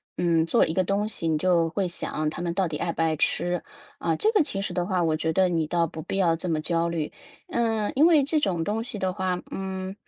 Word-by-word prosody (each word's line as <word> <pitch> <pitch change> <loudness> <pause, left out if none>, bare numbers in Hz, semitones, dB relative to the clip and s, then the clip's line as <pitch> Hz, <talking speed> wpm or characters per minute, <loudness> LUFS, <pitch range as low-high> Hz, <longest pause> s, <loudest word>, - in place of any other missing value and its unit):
嗯， 165 -2 +2
做 165 - +3
一 160 - -3
个 185 0 +1
东 205 +2 0
西， 165 - -1
你 155 -1 +2
就 170 -1 +2
会 195 -1 0
想 155 -2 -2
他 155 - -6
们 170 -1 -2
到 190 +1 +1
底 150 - -3
爱 170 - -2
不 - - -2
爱 160 -1 +1
吃？ 175 +4 0 0.4
啊， - - 0
这 435 +1 +2
个 425 - +4
其 195 -10 -1
实 190 - -3
的 175 -1 0
话， 185 -2 0
我 160 -1 +1
觉 160 +1 -1
得 185 0 +3
你 165 -3 0
倒 170 +1 +1
不 160 - -8
必 - - -4
要 170 -4 +3
这 180 - -4
么 155 -2 0
焦 170 +1 +1
虑。 165 -3 -2 0.4
嗯， 225 -7 0
因 305 +5 +6
为 310 -5 +5
这 305 +3 +1
种 180 - 0
东 210 +5 -1
西 230 -2 -3
的 185 -1 0
话 185 -1 -2
嗯， 190 0 -4
180 Hz, 280 characters per minute, -26 LUFS, 165-195 Hz, 0.4 s, 因